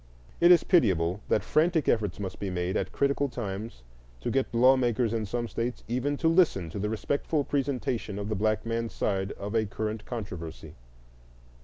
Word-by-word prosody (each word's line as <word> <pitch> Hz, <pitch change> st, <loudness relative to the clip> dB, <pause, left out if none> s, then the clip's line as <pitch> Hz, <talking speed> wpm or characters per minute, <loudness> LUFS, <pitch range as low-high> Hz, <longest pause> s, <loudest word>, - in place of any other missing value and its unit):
It 170 Hz, -, +6 dB
is 175 Hz, -1 st, +7 dB
pitiable 95 Hz, -, +2 dB
that 105 Hz, -, +2 dB
frantic 160 Hz, -1 st, +2 dB
efforts 105 Hz, -5 st, +1 dB
must 95 Hz, -2 st, -5 dB
be 100 Hz, -, -3 dB
made 90 Hz, 0 st, -2 dB
at -, -, -1 dB
critical 140 Hz, 0 st, +1 dB
times 105 Hz, -, -6 dB, 0.4 s
to -, -, -2 dB
get 135 Hz, -1 st, 0 dB
law 125 Hz, +3 st, +6 dB
makers 120 Hz, -2 st, +1 dB
in 110 Hz, -2 st, -1 dB
some 120 Hz, +3 st, -2 dB
States 120 Hz, +2 st, -3 dB
even 130 Hz, +5 st, -1 dB
to 165 Hz, -, +1 dB
listen 160 Hz, -, +3 dB
to 100 Hz, -, -5 dB
the 105 Hz, +2 st, -1 dB
respectful 140 Hz, +7 st, -1 dB
presentation 130 Hz, -7 st, -2 dB
of 100 Hz, 0 st, -4 dB
the 110 Hz, -, -1 dB
black 110 Hz, +1 st, 0 dB
man's 115 Hz, 0 st, -2 dB
side 95 Hz, -1 st, -1 dB
of 100 Hz, +1 st, -6 dB
a 110 Hz, -1 st, +2 dB
current 110 Hz, +1 st, -4 dB
controversy. 90 Hz, -9 st, -6 dB
115 Hz, 180 wpm, -28 LUFS, 100-135 Hz, 0.4 s, is